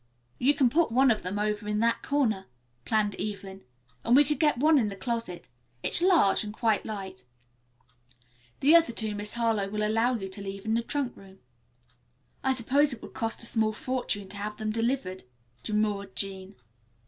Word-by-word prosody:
"You 280 +4 +3
can 265 - +4
put 320 -2 +2
one 260 +2 +5
of 215 - 0
them 185 +3 -4
over 210 0 -1
in 210 0 0
that 230 0 +2
corner," 235 - 0 0.4
planned 215 -2 +1
Evelyn, 195 -2 -5 0.4
"and 235 - +4
we 290 - +8
could 295 +1 -2
get 300 -5 +3
one 305 +3 +5
into 215 -4 +1
the 200 - -6
closet. 230 -5 -4 0.4
It's - - +1
large 345 - +4
and 210 - -5
quite 220 -1 0
light. 195 - -6 1.4
The 295 +5 +6
other 330 -7 +5
two 220 -2 -2
Miss 205 0 -3
Harlowe 225 -4 0
will 210 +1 -1
allow 225 +4 +2
you 195 -4 -4
to 190 +2 -6
leave 195 0 -7
in 220 - 0
the 230 - +2
trunk 265 +1 -3
room." 195 -1 -15 1.1
"I 265 0 +2
suppose 280 +5 +3
it 245 - -7
will - - -8
cost 225 -2 -3
a - - -4
small 220 -2 +1
fortune 225 -4 -3
to 205 - -7
have 210 +1 -5
them 215 -1 -2
delivered," 225 -5 -1 0.4
demurred 210 -2 -1
Jean. 195 0 -5
220 Hz, 185 wpm, -28 LUFS, 200-250 Hz, 1.4 s, we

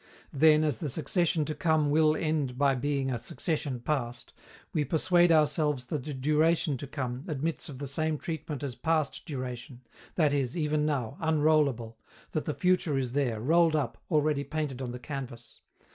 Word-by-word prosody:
Then, 155 +2 +5
as 150 -7 0
the 150 - -3
succession 160 +2 0
to 155 - -3
come 155 -2 +1
will 155 0 +4
end 150 -6 -1
by 140 0 +3
being 135 +1 -1
a 120 - -2
succession 140 0 -3
past, 120 -4 -3 0.4
we 155 - +1
persuade 175 +4 +3
ourselves 150 -3 +2
that 140 0 -3
the 150 - -4
duration 155 +2 +2
to 140 - -7
come 130 -3 -4
admits 155 +1 -3
of 135 - -8
the 140 - -5
same 155 +3 -1
treatment 155 -3 -5
as 135 -3 -3
past 155 +1 -1
duration, 125 -3 -6 0.3
that 155 -4 +3
it 145 - +2
is, 130 +3 -3
even 150 -1 +1
now, 135 -3 -2
unrollable, 150 -8 +2 0.3
that 155 - -2
the 150 - -2
future 180 -5 +1
is 130 -2 -1
there, 125 -5 0
rolled 165 +6 +3
up, 145 -5 -2
already 150 -3 +2
painted 145 -4 -3
on 125 - -3
the 120 - -5
canvas. 125 -2 -8
150 Hz, 175 wpm, -29 LUFS, 130-155 Hz, 0.4 s, Then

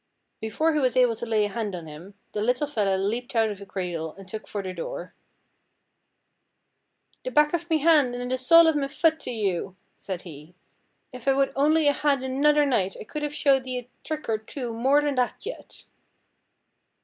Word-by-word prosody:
Before 310 +10 0
he 305 - +1
was 255 -2 +1
able 245 -2 +4
to 235 - -5
lay 215 -2 +2
a - - -3
hand 205 -2 -3
on 170 -2 -7
him, 160 +6 -11 0.2
the 210 - -3
little 250 +6 +1
fella 210 -9 0
leaped 230 +6 -3
out 225 -1 +3
of 200 - -8
the 200 - -11
cradle 175 -5 -4
and 195 -1 -13
took 215 +2 -7
for 205 -1 -4
the 185 -1 -5
door. 175 0 -6 2.1
'The - - -3
back 300 -8 +3
of 345 0 -2
me 320 - +3
han' 295 -6 +4
an' 245 0 -4
the 255 - +1
sole 330 +6 +7
of 320 -1 +3
me 280 -2 0
fut 315 +3 +1
to - - -6
you!' 195 -5 -2 0.2
said 185 -3 -6
he, 160 0 -12 0.6
'if 250 0 -10
I 270 - +5
would 275 0 +1
only 300 +2 +3
a 285 - +5
had 280 -2 +1
another 295 +3 +3
night 200 -9 0
I - - -6
could 300 +8 -6
have 295 0 -3
showed 275 -3 +3
thee 255 -1 -4
a 250 0 -8
trick 310 -1 -5
or 220 -1 0
two 235 +2 -6
more 270 +6 +3
than 290 -1 0
that 250 +7 -1
yet.' - - -9
250 Hz, 210 wpm, -25 LUFS, 205-290 Hz, 2.1 s, sole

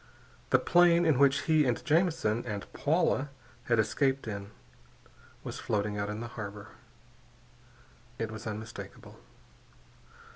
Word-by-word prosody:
The - - +6
plane 175 -1 +4
in 155 -5 +3
which 140 0 +4
he 155 -2 +4
and 125 -3 -1
Jamison 160 - +2
and 105 -4 -5
Paula 145 -2 +1 0.4
had 115 - +2
escaped 135 +4 +1
in 100 -2 -5 0.9
was - - -6
floating 105 0 -1
out 100 0 -2
in 105 +1 -4
the 120 - -5
harbor. 105 -2 -7 1.5
It 115 -2 -3
was 110 +1 -7
unmistakable. 110 +1 -8
120 Hz, 120 wpm, -30 LUFS, 105-150 Hz, 1.5 s, The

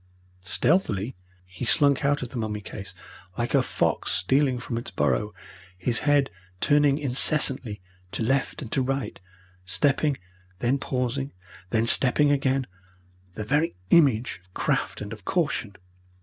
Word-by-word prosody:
Stealthily 120 - 0 0.3
he 90 +4 -9
slunk 140 +3 +3
out 145 -1 +1
of 125 - -6
the - - -12
mummy 110 -2 -3
case, 100 0 -9 0.5
like 120 0 -2
a - - +5
fox - - -1
stealing 130 +8 +1
from 120 -1 -4
its 120 - -8
burrow, 105 0 0 0.5
his 115 +6 0
head 145 -2 +2 0.3
turning 145 +2 +3
incessantly 135 -5 +3 0.3
to - - -3
left 135 +5 -1
and 115 - -9
to 135 - +1
right, 135 +1 -3 0.4
stepping, 135 - +1 0.4
then 125 +7 0
pausing, 130 +1 -2 0.4
then 110 +3 +1
stepping 140 +4 +5
again, 135 -1 +1 0.7
the 105 - -5
very 145 - 0 0.2
image 125 - +3
of 90 0 -28
craft - - -1
and 105 +1 -6
of 105 -2 -11
caution. 145 - -1
130 Hz, 140 wpm, -25 LUFS, 110-140 Hz, 0.7 s, a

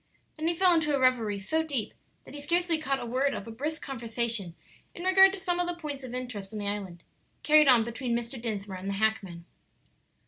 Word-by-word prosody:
Then 315 0 -2
he 340 - +1
fell 365 +1 +5
into 305 -3 +2
a - - 0
revery 240 -5 +2
so 315 +12 -1
deep 280 -9 -3 0.3
that - - -12
he 290 - -7
scarcely 340 +2 +1
caught 275 -3 -1
a - - -5
word 260 +4 0
of 200 - -6
a 230 - -8
brisk 300 +7 -4
conversation, 230 -7 -3 0.4
in 345 - -7
regard 385 +1 +6
to 395 - -5
some 355 -2 -1
of 355 - +1
the 350 - -2
points 290 -4 -5
of 250 -2 -7
interest 240 -6 -5
on 215 - -6
the 205 -1 -3
island, 195 -4 -4 0.4
carried 305 -1 +6
on 245 -4 +6
between 235 +1 -2
Mr. 235 +1 -6
Dinsmore 205 -4 -4
and 190 +2 -5
the - - -1
hackman. 195 -5 -1
255 Hz, 220 wpm, -28 LUFS, 220-310 Hz, 0.4 s, regard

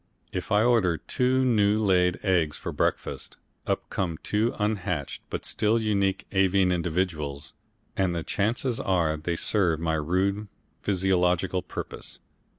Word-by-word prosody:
If - - -4
I 105 +1 +4
order 110 -9 +3
two 130 +6 +1
new 105 -4 +3
laid 90 -4 +3
eggs 90 -6 +2
for - - -5
breakfast, - - -2 0.3
up - - -1
come 85 -4 -1
two 110 +3 0
unhatched 100 -8 -2
but - - -4
still 110 +2 +1
unique 100 -3 0
avian 95 -1 +3
individuals, 85 -5 -2 0.4
and 95 -3 +1
the 85 - -2
chances 115 +6 0
are 85 -5 +1
they 80 +3 -2
serve 90 -3 +1
my 80 -1 0
rude 95 +7 0 0.3
physiological 90 -1 +1
purpose. 90 - -6
95 Hz, 135 wpm, -27 LUFS, 85-105 Hz, 0.4 s, I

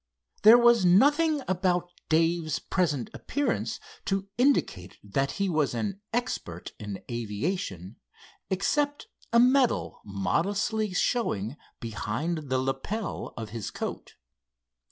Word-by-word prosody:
There 220 +3 +9
was 235 -3 +5
nothing 290 - +4
about 180 -1 0 0.2
Dave's 165 -1 +2
present 150 -9 -1
appearance 285 0 -2 0.3
to 195 0 -1
indicate 240 - +1
that 135 +7 -1
he 200 -1 0
was 155 -8 +1
an 195 - -3
expert 90 - -3
in 105 -2 -6
aviation 110 - -3 0.5
except 290 - 0 0.3
a 235 - +5
medal 255 +1 +3
modestly 195 - 0
showing 145 - 0 0.2
beyond 135 +8 -3
the 130 - +2
lapel 135 +11 -3
of 110 -2 -5
his 115 -3 -4
coat. - - -6
175 Hz, 110 wpm, -28 LUFS, -, 0.5 s, There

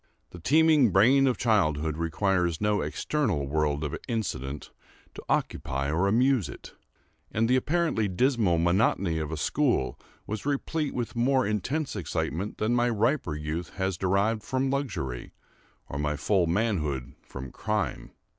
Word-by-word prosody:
The 90 - -10
teeming 150 - +4
brain 125 +9 +5
of 125 - +1
childhood 80 - +1
requires 85 +1 0
no 105 0 +1
external 105 - -1
world 75 0 0
of 75 - -3
incident 75 - -3 0.4
to - - -9
occupy 70 +1 -1
or 85 +5 +2
amuse 120 - +2
it; - - -10 0.6
and 110 +1 +1
the 125 - +3
apparently 150 -5 +1
dismal 105 -3 +2
monotony 85 -1 +2
of 75 -1 -4
a 80 - -3
school 120 - 0 0.3
was 110 0 -4
replete 145 +1 -2
with 120 -2 -3
more 130 +2 +2
intense 115 - -2
excitement 95 +1 -3
than 110 +3 0
my 120 0 +2
riper 115 - 0
youth 75 +3 -5
has 95 -1 -1
derived 100 +4 +1
from 130 +1 -1
luxury, 95 - -3 0.5
or 70 - -5
my 75 0 0
full 90 +4 +1
manhood 80 - -1
from 65 -1 -9
crime. 105 - -2
100 Hz, 145 wpm, -27 LUFS, 80-125 Hz, 0.6 s, brain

